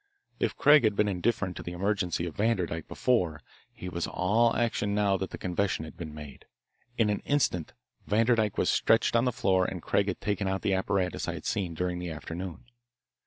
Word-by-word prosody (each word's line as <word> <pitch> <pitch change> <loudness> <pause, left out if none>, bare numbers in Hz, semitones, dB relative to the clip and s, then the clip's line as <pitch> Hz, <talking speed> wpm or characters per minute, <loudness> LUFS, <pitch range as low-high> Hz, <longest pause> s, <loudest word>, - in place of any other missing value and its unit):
If - - 0
Craig 150 -1 +6
had 110 -2 +2
been 105 0 +2
indifferent 95 -1 -1
to - - -5
the 85 - -6
emergency 90 -2 -1
of 85 - -6
Vanderdyke 90 -7 0
before, 90 -11 0 0.3
he 90 - -9
was 85 -1 -3
all 110 +6 +2
action 110 -3 0
now 100 -2 +2
that 95 0 -4
the - - -7
confession 90 -2 -1
had 80 - -11
been 80 -3 -7
made. 75 -3 -10 0.5
In 110 -3 +3
an 105 - -1
instant 115 - 0 0.3
Vanderdyke 110 -1 +2
was - - +2
stretched 115 +1 +3
on 115 +2 +4
the 125 - +2
floor 95 -6 +2
and 90 0 -3
Craig 100 0 +1
had 95 - -2
taken 105 -1 -1
out 95 0 -2
the 100 - +1
apparatus 95 -1 -1
I - - -2
had - - -9
seen 90 -4 -2
during 90 +1 -2
the 90 0 -4
afternoon. 85 +4 -6
95 Hz, 200 wpm, -28 LUFS, 90-105 Hz, 0.5 s, Craig